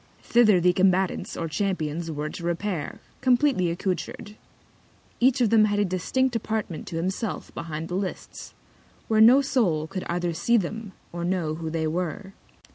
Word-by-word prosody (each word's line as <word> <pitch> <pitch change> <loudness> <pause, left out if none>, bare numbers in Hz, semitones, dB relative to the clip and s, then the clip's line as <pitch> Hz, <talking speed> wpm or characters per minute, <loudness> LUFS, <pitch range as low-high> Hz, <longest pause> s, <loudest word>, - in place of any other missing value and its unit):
Thither 220 -6 +5
the 180 +1 +3
Combatants, 190 0 +1
or 165 - -2
Champions 165 -2 -2
were 150 -1 -3
to 170 - -8
repair, 170 -2 -3 0.2
compleatly 255 -7 +3
accoutred. 190 +4 -4 0.8
Each 250 +1 +3
of 225 -3 +3
them 220 -2 +6
had 205 -1 0
a 205 - +2
distinct 240 +8 0
Apartment 215 -6 -3
to 170 - -6
himself 190 +6 -3
behind 165 -1 -5
the 175 - -6
Lists, 190 +1 -5 0.5
where 220 -1 +3
no 245 +5 +8
Soul 185 - +1
could 185 +3 -5
either 175 0 -1
see 235 +8 +2
them, 210 +1 -4 0.2
or 170 0 -4
know 175 -3 -1
who 160 0 -5
they 160 0 -1
were. 180 +4 -3
185 Hz, 160 wpm, -25 LUFS, 165-215 Hz, 0.8 s, no